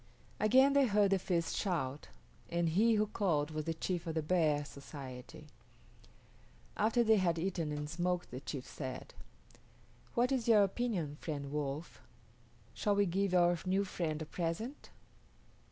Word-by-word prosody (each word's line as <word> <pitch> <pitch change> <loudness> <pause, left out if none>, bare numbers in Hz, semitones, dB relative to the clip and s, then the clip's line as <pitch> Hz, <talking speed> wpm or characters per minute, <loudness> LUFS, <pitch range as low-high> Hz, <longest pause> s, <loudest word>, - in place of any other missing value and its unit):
Again 260 +6 +5
they 280 -2 +5
heard 205 -2 +3
the 195 - +3
feast 170 -3 -1
shout, 150 -8 -2 0.4
and 170 -1 +1
he 220 +7 +4
who 215 0 +3
called 165 -8 0
was 155 -1 -3
the 165 - -1
chief 175 +1 -3
of 165 - -3
the 160 - 0
Bear 150 -3 +2
society. 140 +1 -9 1.3
After 235 +2 +3
they 220 -1 +5
had 175 -3 +2
eaten 170 -3 -2
and 150 0 -3
smoked 175 +2 -2
the 125 - -5
chief 135 -1 -6
said, 130 -3 -7 1.0
"What 245 +2 +2
is 255 -4 0
your 215 -3 +7
opinion, 195 -8 -1
friend 145 -4 -5
Wolf? 150 +2 -4 0.7
Shall 205 -2 +1
we 205 0 +3
give 190 +1 0
our 175 -1 +4
new 195 +2 +2
friend 160 -5 -2
a - - -7
present?" 175 - -4
175 Hz, 155 wpm, -34 LUFS, 150-205 Hz, 1.3 s, your